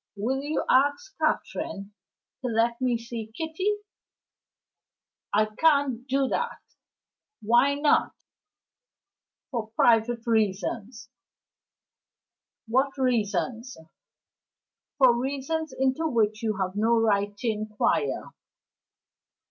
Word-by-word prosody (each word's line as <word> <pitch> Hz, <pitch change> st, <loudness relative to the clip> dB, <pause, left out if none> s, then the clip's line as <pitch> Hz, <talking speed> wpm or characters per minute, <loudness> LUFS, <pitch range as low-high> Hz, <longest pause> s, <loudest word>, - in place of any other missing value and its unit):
Will 250 Hz, +7 st, -1 dB
you 295 Hz, +2 st, -2 dB
ask 285 Hz, -, +2 dB
Catherine 200 Hz, +1 st, -2 dB, 0.5 s
to 255 Hz, -, -2 dB
let 235 Hz, +1 st, +1 dB
me 250 Hz, -2 st, +2 dB
see 230 Hz, -1 st, -7 dB
Kitty?" 325 Hz, +5 st, -1 dB, 1.6 s
"I 215 Hz, +1 st, +3 dB
can't 265 Hz, +1 st, +1 dB
do 270 Hz, +1 st, +1 dB
it." 475 Hz, -, -4 dB, 0.7 s
"Why 240 Hz, +6 st, +4 dB
not?" 290 Hz, +1 st, +2 dB, 1.4 s
"For 230 Hz, -4 st, -3 dB
private 230 Hz, 0 st, +3 dB
reasons." 220 Hz, +2 st, -1 dB, 1.6 s
"What 265 Hz, +4 st, +1 dB
reasons?" 230 Hz, -1 st, -1 dB, 1.2 s
"For 260 Hz, -4 st, +6 dB
reasons 280 Hz, +5 st, -2 dB
into 265 Hz, +5 st, 0 dB
which 220 Hz, -5 st, +1 dB
you 215 Hz, -3 st, -1 dB
have 190 Hz, -1 st, -2 dB
no 225 Hz, +2 st, +3 dB
right 205 Hz, -2 st, +1 dB
to 240 Hz, -, -4 dB
inquire." 215 Hz, -, -1 dB
235 Hz, 90 wpm, -26 LUFS, 215-275 Hz, 1.6 s, For